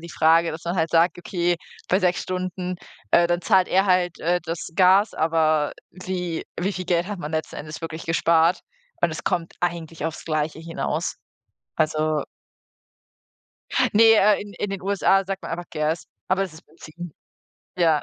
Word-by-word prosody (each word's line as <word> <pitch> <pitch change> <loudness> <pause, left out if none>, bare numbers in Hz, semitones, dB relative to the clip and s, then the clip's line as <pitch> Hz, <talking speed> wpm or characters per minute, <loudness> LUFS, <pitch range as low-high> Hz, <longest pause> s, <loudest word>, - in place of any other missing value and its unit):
die 170 0 -10
Frage, 165 +2 +4
dass 160 +2 -8
man 175 +2 -2
halt 160 -1 +1
sagt: 170 +1 +3
„Okay, 175 -1 0 0.3
bei 185 - +3
6 180 -2 +1
Stunden, 185 0 -3 0.3
äh, 170 - +5
dann 175 0 0
zahlt 190 -1 +3
er 190 +2 +3
halt, 180 -2 +2
äh, 175 +2 +1
das 165 +1 -5
Gas“, 190 +3 +5
aber 155 -2 +2 0.2
wie 180 -2 -4 0.2
wie 195 +3 0
viel 185 - -5
Geld 175 0 +1
hat 205 -1 -5
man 150 -3 -5
letzten 160 0 -3
Endes 155 +1 -7
wirklich 165 -1 -6
gespart 165 +1 +3 0.4
und 170 - +3
es 160 - -6
kommt 170 -2 -1
eigentlich 165 -3 -3
aufs 160 -1 -4
Gleiche 155 -1 -1
hinaus. 165 +1 -3 0.6
Also 155 -1 +1 1.7
Ne, 225 +1 +7
äh, 210 0 +4
in 205 0 -11
in 205 - -3
den 195 -2 -5
USA 195 0 +2
sagt 195 0 -4
man - - -6
einfach 175 +1 -5
Gas, 155 +1 -1 0.2
aber 190 +1 +2
es 190 - -4
ist 160 - -15
Benzin. 170 +1 -10 0.6
Ja. 165 -4 +3
175 Hz, 175 wpm, -23 LUFS, 160-185 Hz, 1.7 s, Ne